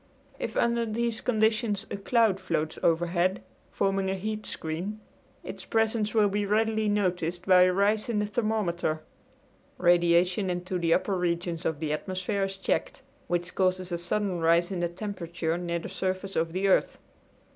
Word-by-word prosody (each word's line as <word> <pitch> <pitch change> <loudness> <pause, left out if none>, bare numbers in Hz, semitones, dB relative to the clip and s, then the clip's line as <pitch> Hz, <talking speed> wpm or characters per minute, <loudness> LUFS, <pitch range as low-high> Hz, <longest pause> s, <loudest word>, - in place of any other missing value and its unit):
If - - -4
under 235 0 +2
these 230 0 -2
conditions 220 -2 +1
a - - -2
cloud 205 0 +2
floats 160 -4 -2
overhead, 175 +3 +1 0.3
forming 195 -1 0
a 190 - 0
heat 215 +2 -4
screen, 175 +7 -4 0.4
its - - -7
presence 225 -1 0
will 215 -2 +5
be 205 +1 -1
readily 220 +1 +1
noticed 180 -3 -1
by 185 -1 +6
a 185 - +3
rise 205 +4 +1
in 230 - 0
the 210 - +1
thermometer. 205 -8 -1 0.7
Radiation 175 +2 +3
into 180 +1 -2
the 165 -1 0
upper 190 +3 +2
regions 175 -1 -1
of 160 -3 -2
the 155 -1 -1
atmosphere 190 +4 -2
is 195 0 -6
checked, 190 - -2 0.2
which 175 0 -2
causes 185 -1 0
a 170 - 0
sudden 185 +1 -1
rise 170 +2 +3
in 185 - -2
the 175 0 0
temperature 170 -3 -3
near 170 -1 -2
the 165 - -6
surface 190 +1 -3
of 165 0 0
the 190 +3 0
earth. 190 - +2
185 Hz, 165 wpm, -28 LUFS, 175-210 Hz, 0.7 s, by